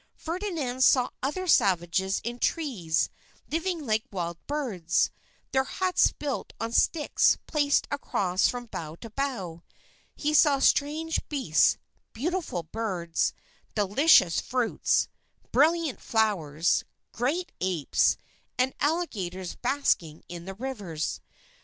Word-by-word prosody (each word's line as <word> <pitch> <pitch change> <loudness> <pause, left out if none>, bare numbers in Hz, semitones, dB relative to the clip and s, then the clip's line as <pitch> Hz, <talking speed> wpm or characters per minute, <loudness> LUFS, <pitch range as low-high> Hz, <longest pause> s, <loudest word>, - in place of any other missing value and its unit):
Ferdinand 325 -8 -3
saw 255 -1 +4
other 300 +8 -2
savages 190 - +2
in 240 +1 -4
trees 220 - 0 0.4
living 330 0 -1
like 220 -2 +1
wild 170 -3 -4
birds, 245 - 0 0.4
their 265 0 +3
huts 370 +4 +2
built 285 -3 -4
on 225 0 -3
sticks 300 +5 +3
placed 290 -2 +1
across 195 -9 +1
from 245 -1 -3
bough 160 -8 -6
to 225 +5 -11
bough. 215 -11 -3 0.5
He 300 +1 -1
saw 290 -2 +6
strange 305 +4 +2
beasts, 260 - +3 0.4
beautiful 310 - -2
birds, 180 -3 -2 0.4
delicious 205 - +5
fruits, 245 -2 +1 0.4
brilliant 320 -2 +2
flowers, 175 -8 +1 0.3
great 300 +10 -1
apes, 180 -6 +2 0.4
and 255 +1 +2
alligators 195 - -2
basking 240 - 0
in 170 -1 -8
the 195 0 -7
rivers. 205 -10 -4
245 Hz, 110 wpm, -27 LUFS, 185-295 Hz, 0.5 s, saw